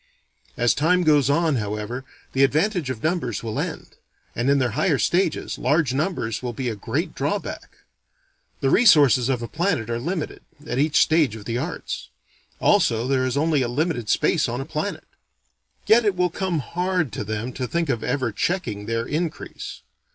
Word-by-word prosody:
As 120 0 +3
time 180 +4 +2
goes 150 -4 +4
on, 160 -1 +2
however, 105 +4 -4 0.3
the 135 - +3
advantage 160 +2 +1
of 120 -4 -5
numbers 160 - -1
will 110 -2 -3
end; - - -5 0.4
and 120 +3 0
in 140 - +4
their 125 -3 +1
higher 150 - +1
stages, 170 - 0
large 150 -4 +2
numbers 135 - -1
will 125 -1 -4
be 125 +1 -2
a 110 - -3
great 100 - -3
drawback. - - -3 0.9
The 135 - +2
resources 145 - +6
of 125 -3 0
a - - -4
planet 160 - -1
are 115 - -1
limited, 165 +4 -4 0.2
at 135 - -2
each 150 +1 +3
stage 155 -8 +3
of 105 -2 -10
the 115 +2 -2
arts. - - -5 0.5
Also, 115 +1 +3
there 130 -1 +1
is 130 - -1
only 155 -1 +2
a 125 - +1
limited 120 -3 -1
space 155 -8 +2
on 120 +1 -3
a 135 - -4
planet. 155 +6 -4 0.8
Yet 235 +2 +5
it 205 -3 +1
will 180 -1 +1
come 185 -2 -1
hard 180 -2 -1
to - - -4
them 110 +4 -4
to 130 -1 -3
think 170 +3 -1
of 120 -5 -1
ever 130 -4 -1
checking 105 - -2
their 115 0 -1
increase. 160 +3 -4
140 Hz, 180 wpm, -23 LUFS, 120-165 Hz, 0.9 s, resources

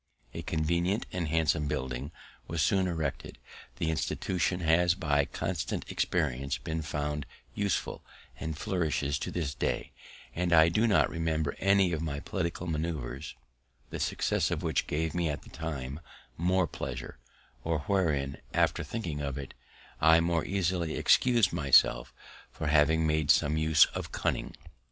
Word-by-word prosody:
A - - -5
convenient 85 +6 0
and 90 -3 -2
handsome 80 -1 +1
building 65 0 -3 0.4
was 80 -2 0
soon 95 -2 +2
erected; 80 -3 -3 0.4
the 80 - -1
institution 90 +3 -1
has 85 +2 +3
by 70 -6 +1
constant - - -3
experience 70 -5 -1
been 80 0 -4
found 75 -1 -3 0.3
useful, 100 -3 -2 0.4
and 80 -1 -4
flourishes 80 -7 -1
to - - -4
this 80 -6 -2
day; - - -2 0.4
and 90 0 0
I 80 0 +7
do 110 +7 +2
not 105 - +4
remember 80 -3 -1
any 100 -1 +4
of 80 - -2
my 70 -3 -3
political 85 +4 -3
manoeuvers, 75 -5 -4 0.6
the - - -4
success - - 0
of - - -2
which - - 0
gave 80 +1 -1
me 85 -2 0
at 75 - -4
the - - -15
time 70 -3 -5 0.4
more 90 +2 +2
pleasure, 60 -4 -6 0.4
or 80 -2 -1
wherein, 70 -6 0 0.2
after - - +2
thinking 85 -10 -4
of 70 -1 -3
it, 70 -1 -7 0.5
I 80 +1 +7
more 85 -1 +1
easily 90 -4 -1
excus'd 120 -9 +4
myself 70 -6 +4 0.4
for - - -7
having 75 +2 +4
made 75 -1 +1
some 75 +1 +4
use 80 -1 +5
of - - -5
cunning. - - -2
80 Hz, 145 wpm, -30 LUFS, 75-85 Hz, 0.6 s, I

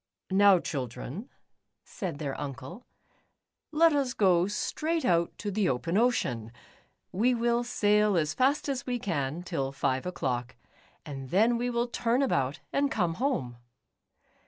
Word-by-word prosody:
"Now, 200 0 +6
children," 135 - -5 0.5
said 180 -9 -5
their 145 -2 -3
uncle, 140 - -7 0.8
"let 325 +1 +5
us 275 -4 0
go 180 -3 +4
straight 315 +9 -2
out 170 -3 +1
to 205 - -4
the 200 -1 +1
open 130 +7 -1
ocean. 125 - +1 0.6
We 245 +6 +2
will 235 +1 +1
sail 210 -4 +2
as 155 -1 +1
fast 275 - +1
as 275 -2 -3
we 250 -1 0
can, 165 - -2
till 140 -7 -2
five 130 +1 -1
o'clock, 125 -8 -3 0.5
and 135 -3 -7
then 220 - +3
we 245 +1 -1
will 240 0 0
turn 240 +2 +1
about 135 - 0
and 280 0 +2
come 175 -9 0
home." 130 - -1
195 Hz, 140 wpm, -29 LUFS, -, 0.8 s, Now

